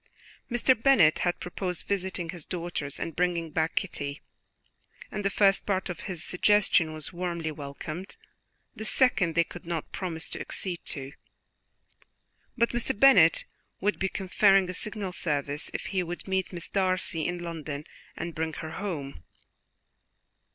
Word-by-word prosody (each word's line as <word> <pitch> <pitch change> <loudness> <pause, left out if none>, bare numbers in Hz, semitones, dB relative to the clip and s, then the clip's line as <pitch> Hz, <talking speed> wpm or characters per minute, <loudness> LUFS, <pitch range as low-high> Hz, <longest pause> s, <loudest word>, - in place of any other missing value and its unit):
Mr. 240 +1 +4
Bennet 225 - +5
had 175 -1 0
proposed 180 0 -4
visiting 190 -3 -2
his 170 -2 -5
daughters 170 -5 -4
and 165 - -4
bringing 170 -2 0
back 160 +2 0
Kitty, 145 -6 -2 0.9
and 210 - -3
the 200 - +2
first 195 0 +4
part 190 -2 0
of 175 - -8
this 175 -4 -3
suggestion 185 -4 +3
was 155 +2 -5
warmly 170 -2 -2
welcomed; 155 +5 -7 0.6
the - - -6
second 195 - +3
they 170 - +5
could 175 +1 -11
not 170 -3 -3
promise 165 -4 -3
to - - -4
accede 180 -3 -4
to, 135 -3 -4 1.5
but 235 0 +3
Mr. 240 -3 0
Bennet 190 -12 +7 0.3
would 205 +2 0
be 190 - +1
conferring 195 0 +4
a - - -7
signal 205 -1 -2
service 145 -4 -1
if - - -4
he 190 - +2
would 175 +1 -6
meet 190 -1 0
Miss 170 -3 -4
Darcy 185 -4 +1
in 175 - -2
London 160 -4 -5 0.3
and 170 0 -4
bring 160 0 -2
her 160 0 -6
home. 155 - -5
175 Hz, 150 wpm, -28 LUFS, 160-195 Hz, 1.5 s, Bennet